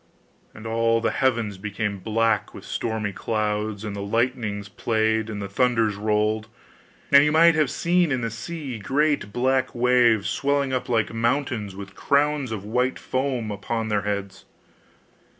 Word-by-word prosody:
And 110 - -11
all 115 0 +2
the 115 - 0
heavens 115 -7 0
became 105 0 -3
black 110 +1 0
with - - -10
stormy 110 -3 -3
clouds, 105 -1 -2
and 105 -1 -4
the 100 - -5
lightnings 110 -1 -1
played, 110 +1 0
and 105 -2 -5
the 100 - -4
thunders 115 0 +1
rolled; 105 +1 0 0.6
and 140 0 +8
you 150 - +2
might 165 +2 +6
have 155 -4 +2
seen 175 +1 +1
in 130 -2 0
the 115 -1 -2
sea 140 -1 -6
great 140 +1 0
black 130 +2 0
waves, 120 -3 +3
swelling 140 -1 0
up 130 - -2
like 115 -2 +1
mountains 115 -4 -1
with 100 0 -9
crowns 145 -2 +1
of 105 -3 -5
white 125 +4 0
foam 130 -4 -2
upon 110 +2 -3
their 105 -1 +1
heads. 100 -1 -4
115 Hz, 155 wpm, -24 LUFS, 105-130 Hz, 0.6 s, and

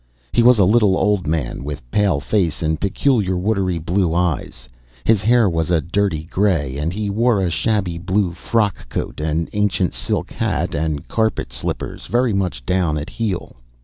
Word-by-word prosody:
He 120 - +4
was 125 0 +6
a 100 - +5
little 105 -1 +4
old 100 -3 +1
man, 75 -5 -2
with 70 -3 -6
pale 100 -8 +2
face 85 -1 0
and 80 -1 -1
peculiar 100 -2 +1
watery 95 -2 0
blue 85 +1 0
eyes; 80 -8 -2 0.4
his 110 -3 +3
hair 115 +1 +4
was 80 -3 -1
a 85 -2 +3
dirty 85 0 -1
grey, 85 -6 0
and 80 +3 -1
he 105 +3 -3
wore 115 +1 +2
a 90 -3 0
shabby 95 -4 0
blue 95 +1 0
frock 105 +3 -1
coat, - - -4
an 80 +2 -1
ancient 105 -3 +1
silk - - -2
hat, - - -1
and 75 -1 -2
carpet 110 - -1
slippers 65 - -4
very 120 -1 +1
much 90 -11 -2
down 90 -3 +1
at 75 - -5
heel. 105 - -3
95 Hz, 175 wpm, -20 LUFS, 80-105 Hz, 0.4 s, was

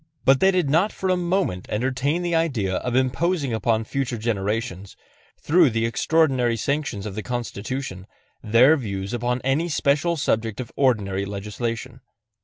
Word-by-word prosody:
But 135 0 +5
they 190 - +5
did 180 -5 +1
not 165 +9 +2
for 190 - -3
a - - +3
moment 175 - -1
entertain 130 +8 -1
the 175 -1 -1
idea 125 - 0
of 125 -1 -3
imposing 135 +2 +1
upon 110 +1 +1
future 130 0 -3
generations, 105 -2 -3 0.4
through 165 -1 +4
the 115 0 0
extraordinary 130 -2 +2
sanctions 140 -5 -2
of 105 - -5
the 110 - -4
Constitution, 120 -3 -5 0.3
their 120 +8 +5
views 100 -5 -4
upon 120 +1 -1
any 140 +6 +1
special 150 +3 +1
subject 115 -5 -1
of 125 - -6
ordinary 100 -8 +1
legislation. 115 +5 -5
125 Hz, 150 wpm, -23 LUFS, 110-150 Hz, 0.4 s, But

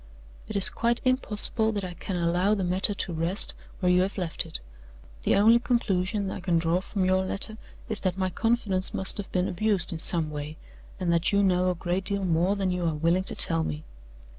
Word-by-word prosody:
It 215 - -7
is 200 - +4
quite 235 +1 0
impossible 220 -3 +2
that 205 -2 -3
I 180 -1 -5
can 180 +2 -6
allow 175 +4 +1
the 195 - -2
matter 185 +3 +3
to 185 -2 -3
rest 165 +5 0 0.3
where 180 -2 +2
you 180 0 +4
have 195 +3 -2
left 175 -4 -3
it. - - -5 0.6
The - - +2
only 225 +4 +5
conclusion 200 -4 -1
I - - -5
can 175 -2 0
draw 165 +2 0
from 190 0 -2
your 185 0 +2
letter 205 +3 -4 0.3
is 220 - -4
that 185 -1 -2
my 185 -1 -1
confidence 215 -4 0
must 190 - +3
have 200 - -6
been 180 0 0
abused 200 -1 0
in 165 - -5
some 160 -2 +2
way, 150 +1 -6 0.4
and 175 -2 0
that 170 0 +1
you 200 0 +2
know 185 -1 +2
a 180 - -1
great 180 +2 -3
deal 200 -1 +1
more 175 +3 +1
than 195 -2 -1
you 180 -1 -2
are 160 - -1
willing 170 +5 +1
to - - +2
tell 80 0 +2
me. 75 -1 -5
185 Hz, 215 wpm, -26 LUFS, 175-200 Hz, 0.6 s, only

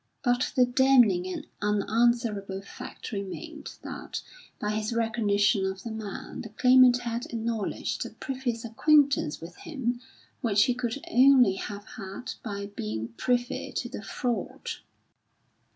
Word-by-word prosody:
But 245 0 +2
the 250 - +6
damning 245 -8 +4
and 185 - -5 0.2
unanswerable 210 -1 +1
fact - - -9
remained 200 -3 -6
that, - - -6 0.4
by 210 - -1
his 215 +1 -1
recognition 215 -3 +2
of 190 0 -3
the 230 - -5
man, 220 -2 -6
the 220 - -8
Claimant 250 +1 +6
had 235 0 -3
acknowledged 225 -2 -2
a - - -9
previous 255 -4 -4
acquaintance 280 - +3
with 170 +2 -10
him 250 -5 -3 0.4
which 205 -3 +4
he 250 - +2
could 245 +2 -3
only 255 -4 +6
have 200 +1 -6
had 195 +4 -6
by 200 -3 -4
being 110 +1 -3
privy 245 - -1
to - - -2
the - - -6
fraud. 245 -3 -3
230 Hz, 135 wpm, -28 LUFS, 200-245 Hz, 0.4 s, the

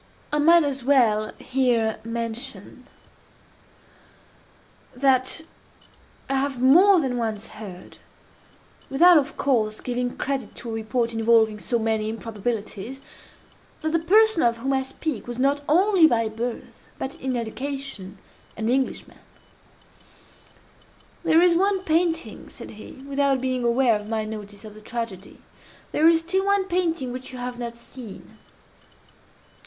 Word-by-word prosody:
I 295 - +2
might 335 +2 +6
as 275 -3 -3
well 235 -6 +3
here 240 -4 0
mention, 230 0 -6 2.1
that 260 +2 +2 0.9
I - - -2
have 270 -1 -1
more 355 +10 +6
than 260 -5 -1
once 220 -2 -2
heard, 200 -5 -11 0.9
(without, 340 +5 +6
of 290 +1 -5
course, 220 -6 0
giving 245 0 -3
credit 270 -5 -3
to 235 - -8
a - - -4
report 230 +1 -1
involving 225 -1 +3
so 235 - 0
many 220 -1 -1
improbabilities,) 225 +1 -5 0.8
that 315 - 0
the 330 - +2
person 420 +2 +4
of 235 -1 +2
whom 270 +4 -1
I 265 - +2
speak, 265 -3 -5
was 240 -1 -5
not 280 +2 +1
only 365 +1 +5
by 230 -5 +1
birth, 230 +2 -5 0.2
but 265 - -4
in 260 -1 -1
education, 240 -4 -5 0.4
an 220 +1 -1
Englishman. 260 +1 -2 2.0
"There 330 +2 +5
is 355 -1 +5
one 385 +1 +1
painting," 325 - -1
said - - -10
he, 215 - -11
without 280 -1 +1
being 255 -1 -1
aware 235 -2 +3
of 210 +1 -10
my 220 -1 -1
notice 210 -1 -8
of 215 - -10
the 215 - -13
tragedy—"there 230 - -3
is 330 -1 +4
still 375 +4 0
one 400 -1 +2
painting 340 -8 -1
which 255 +1 -7
you 255 - -8
have 245 0 -5
not 235 -1 -5
seen." 235 -3 -11
250 Hz, 135 wpm, -24 LUFS, 225-285 Hz, 2.1 s, might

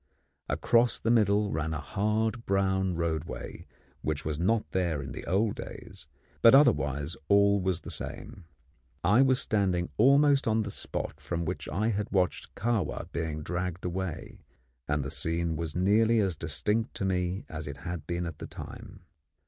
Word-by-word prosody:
Across 120 0 +3
the 115 - +1
middle 105 -2 +3
ran 80 +1 -2
a - - -3
hard 110 +6 -1
brown 95 -1 +1
roadway 85 -1 -4 0.3
which 75 -1 -2
was 75 -1 -2
not 105 +5 +2
there 85 -5 0
in 70 0 -6
the - - -7
old 100 +4 +2
days; - - -9 0.3
but 115 +3 +8
otherwise 75 - +3
all 100 +1 +4
was 90 -2 0
the - - -6
same. 95 - -5 0.6
I 105 +8 +5
was 130 -1 +4
standing 95 -5 0
almost 140 +3 +5
on 110 0 +2
the 100 - -5
spot - - -5
from 85 -1 -3
which 90 +3 -4
we 105 +7 +1
had 105 0 -2
watched 90 -3 0
Kahwa 110 -7 -1
being 80 -2 -3
dragged 90 +2 -3
away, 90 -1 -4 0.5
and 75 -1 0
the 70 - -4
scene 85 0 0
was 80 -1 -4
nearly 110 +5 +3
as 95 -5 +1
distinct 105 - -1
to 95 - -2
me 90 +1 -1
as 80 -1 -6
it 70 -1 -6
had 80 +2 -6
been 85 0 -2
at 85 -3 -6
that - - -7
time. - - -10
95 Hz, 165 wpm, -29 LUFS, 80-105 Hz, 0.6 s, but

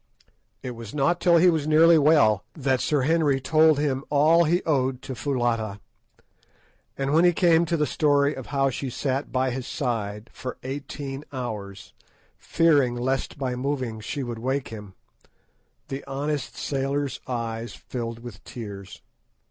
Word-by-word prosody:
It 130 - -4
was 115 -1 -9
not 150 +5 +2
till 175 -2 +5
he 175 +2 +5
was 155 -3 -1
nearly 160 +1 +6
well 125 -10 +4
that 135 -4 0
Sir 150 -3 +1
Henry 150 -1 +2
told 155 +3 +4
him 145 -3 0
of - - -12
all 155 +4 +5
he 175 +4 +1
owed 130 -4 0
to 130 - -5
Foulata; 120 -6 -1 1.2
and 135 +1 -1
when 165 +2 +5
he 175 0 +5
came 170 -1 +4
to 170 +1 0
the 150 - +2
story 145 -1 +2
of - - -8
how 135 -1 +1
she 135 +1 -4
sat 135 +2 -2
by 130 0 +1
his 130 0 -5
side 110 -4 -3
for 125 - -6
eighteen 135 +1 -6
hours, 105 -7 -6 0.5
fearing 145 -7 +3
lest 130 +4 -2
by 130 -3 -2
moving 130 -4 -3
she 110 +6 -4
should 120 -3 -5
wake 130 +3 -2
him, 105 -4 -9 0.9
the 135 +1 -5
honest 145 0 -3
sailor's 140 0 -2
eyes 115 -3 -4
filled 115 -2 -6
with 115 -5 -10
tears. 100 -5 -9
135 Hz, 155 wpm, -25 LUFS, 120-150 Hz, 1.2 s, nearly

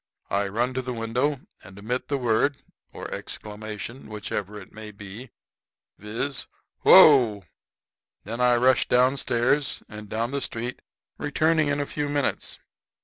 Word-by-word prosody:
I 100 +1 +1
run 120 +6 -1
to 130 - -1
the 125 -1 -5
window 125 +5 -1 0.2
and 95 +1 -13
emit 120 +5 -3
the 140 - 0
word 125 +3 +1 0.3
or - - -7
exclamation, 110 +4 -6
which 105 -1 -7
ever 105 +1 -3
it 95 - -13
may 110 0 -9
be 105 +4 -10 0.7
viz, 115 +6 -3 0.3
'Whoa!' 115 -10 +7 0.8
Then 115 +4 -5
I 125 0 +5
rush 130 +2 +3
down 125 +2 +4
stairs 130 +3 0
and 105 0 -10
down 115 +3 -2
the 140 0 -2
street, 120 +1 -4 0.4
returning 155 +1 +2
in 145 0 0
a 145 - 0
few 145 0 -3
minutes. 145 -1 -1
120 Hz, 145 wpm, -25 LUFS, 105-135 Hz, 0.8 s, Whoa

